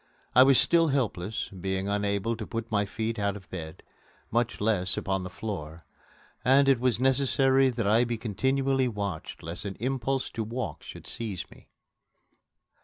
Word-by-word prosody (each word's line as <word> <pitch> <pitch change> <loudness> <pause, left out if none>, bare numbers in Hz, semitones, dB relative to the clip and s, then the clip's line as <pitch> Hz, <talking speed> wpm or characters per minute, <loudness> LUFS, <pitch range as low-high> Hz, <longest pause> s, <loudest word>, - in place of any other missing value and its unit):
I 125 - +8
was 135 0 +7
still 165 -1 +4
helpless, 110 - -1
being 95 0 -3
unable 100 +2 0
to 110 -1 -6
put 115 0 -5
my 105 -1 +2
feet 110 +2 -3
out 100 -1 0
of 95 -3 -15
bed, 80 -4 -7 0.5
much 120 +1 0
less 100 -3 0
upon 95 -1 -1
the 90 - -5
floor, 80 -8 -6 0.6
and 135 +2 +5
it 135 -3 +5
was 125 -2 +1
necessary 135 0 +3
that 120 -3 -2
I 110 +4 +4
be 120 -1 -2
continually 130 +4 +1
watched 100 -7 -4
lest 85 +2 -6
an 100 -2 -5
impulse 135 +2 -1
to 115 - -3
walk 120 +4 -4
should - - -10
seize 110 -6 -4
me. - - -17
110 Hz, 165 wpm, -28 LUFS, 100-130 Hz, 0.6 s, I